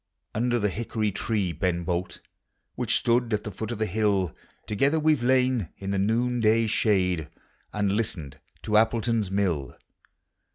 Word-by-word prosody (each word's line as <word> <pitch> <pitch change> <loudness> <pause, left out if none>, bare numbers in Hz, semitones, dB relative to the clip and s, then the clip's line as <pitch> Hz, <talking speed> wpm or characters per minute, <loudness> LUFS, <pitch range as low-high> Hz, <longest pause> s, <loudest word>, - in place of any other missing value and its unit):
Under 120 +2 +1
the 105 -3 0
hickory 110 +1 -2
tree, 100 -2 -1
Beu 85 +1 -1
Bolt, 90 +1 -3 0.5
Which - - +1
stood 120 -1 +2
at 105 - -4
the 105 - -5
foot 110 +3 -5
of 120 - -3
the 110 - 0
hill, 100 -5 0 0.3
Together 140 +9 +1
we 155 0 +4
've 140 - -2
lain 125 -6 +2
in 100 0 -4
the 100 - 0
noonday 115 +1 +2
shade, 90 -7 +1 0.4
And 105 -2 0
listened 95 -9 -3 0.2
to - - -5
Appletou's 115 -2 +1
mill. 90 -9 -1
105 Hz, 155 wpm, -26 LUFS, 95-115 Hz, 0.5 s, we